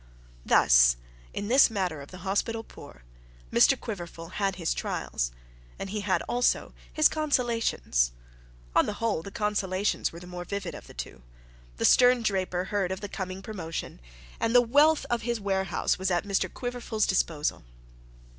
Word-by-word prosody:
Thus - - +5 0.3
in 205 - -4
this 260 +3 +6
matter 185 -8 -2
of 140 - -11
the 185 0 -11
hospital 225 +4 -1
poor 65 - -14 0.5
Mr - - +5
Quiverful 170 -5 -7
had 195 0 -1
his 170 -3 -1
trials; - - -2 0.5
and 195 - -6
he 210 0 -2
had 195 -2 0
also 245 0 0 0.2
his 310 -1 +5
consolations. 230 - 0 0.6
On - - +4
the 210 - -2
whole 225 -6 -1
the 200 - -8
consolations 200 -1 -1
were 170 - -10
the 180 - -11
more 180 0 -6
vivid 200 +2 -4
of - - -10
the - - -14
two. 65 - -7 0.6
The - - 0
stern 250 -1 +6
draper 185 -4 0
heard 195 -1 -1
of 190 - -4
the 205 - -5
coming 190 0 -5
promotion, 165 - -6 0.4
and 230 +2 0
the 245 - +9
wealth 290 +6 +4
of 240 -1 +1
his 235 0 -2
warehouse 190 -3 0
was 190 0 0
at 175 -1 +1
Mr 195 -2 -1
Quiverful's 245 -3 -2
disposal. 160 - 0
195 Hz, 165 wpm, -28 LUFS, 180-230 Hz, 0.6 s, the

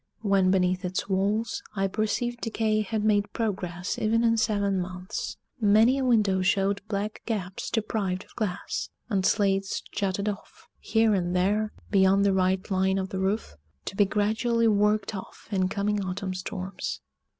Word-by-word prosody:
When 195 -3 +3
beneath 185 0 +2
its 180 +1 -2
walls, 205 +4 0
I 195 -1 +1
perceived 220 +4 -1
decay 220 -1 0
had 215 0 -2
made 205 -1 +2
progress 180 -5 -2
even 225 +2 +2
in 230 -1 +4
seven 205 -3 +1
months 180 0 -5 0.2
many 225 +5 +5
a - - 0
window 210 -7 +3
showed 195 +2 +1
black 210 0 -3
gaps 195 -5 -3
deprived 205 -4 -1
of - - -22
glass; 200 -4 -3 0.2
and 195 -4 +1
slates 195 -1 +1
jutted 200 0 -1
off, 205 -1 -6
here 220 0 +2
and 180 -2 0
there, 210 +4 +1 0.2
beyond 195 0 +4
the 200 - +3
right 185 +1 +1
line 190 0 +2
of 190 0 -2
the 190 - -3
roof, 190 - -1 0.3
to - - -5
be 205 - +4
gradually 225 +3 +1
worked 210 0 +2
off 190 - -9
in 190 -2 +2
coming 205 0 0
autumn 185 0 -3
storms. 185 - -5
200 Hz, 160 wpm, -27 LUFS, 190-215 Hz, 0.3 s, many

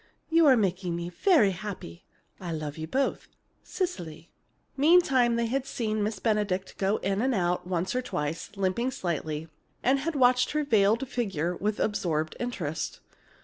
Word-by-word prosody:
You 330 -1 +5
are 260 -3 +7
making 185 -4 0
me 170 0 -4
very 230 - +4
happy. 185 - -7 0.4
I 175 -2 -5
love 150 -2 -4
you 160 0 -5
both. 270 +10 -1 0.3
CECILY. 175 - -5 0.4
Meantime, 275 -6 +4
they 235 0 +1
had 265 +3 -1
seen 215 -5 -2
Miss 210 0 -1
Benedict 200 -3 -1
go 195 +2 +2
in 195 +1 -1
and 260 0 +1
out 180 -1 0
once 180 0 -1
or 255 - 0
twice, 150 -8 -3
limping 195 +6 0
slightly, 160 - -3 0.4
and 265 +2 +3
had 315 +3 -3
watched 250 -1 +4
her 300 0 +1
veiled 225 0 +3
figure 180 -9 -2
with 210 +3 -2
absorbed 160 -7 -1
interest. 175 -11 -3
205 Hz, 155 wpm, -28 LUFS, 175-250 Hz, 0.4 s, are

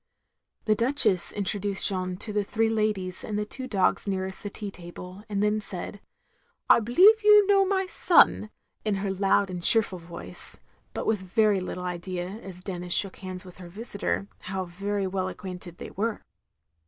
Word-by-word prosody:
The 215 - +4
Duchess 230 -5 +2
introduced 200 0 -1
Jeanne 185 -2 0
to 210 +2 -1
the 210 0 +1
three 225 +2 0
ladies 210 -5 -1
and 210 - -3
the 210 - -1
two 260 +4 -5
dogs 200 -3 +1
nearest 190 -1 -3
the 205 - -5
tea 205 0 -6
table, 180 +2 -10
and 200 -1 0
then 210 +1 +2
said, 200 +1 -7 0.7
"I - - +7
believe 370 - +6
you 420 -1 +7
know 395 -1 +4
my 385 -1 +1
son," 345 -11 +4 0.3
in 215 -2 0
her 195 0 -2
loud 195 0 +2
and 180 -1 -5
cheerful 200 -1 +2
voice, 170 0 -9 0.4
but - - -3
with 220 -2 +1
very 200 +2 +2
little 180 0 -5
idea, 180 0 -4
as 180 -2 -10
Denis 180 -2 -2
shook 195 -2 +2
hands 185 -1 -7
with 180 - -13
her 180 -2 -10
visitor, 100 - -3
how 190 0 -3
very 200 +3 -3
well 185 0 -2
acquainted 180 -3 -8
they - - -8
were. 220 +2 -2
195 Hz, 175 wpm, -27 LUFS, 185-215 Hz, 0.7 s, I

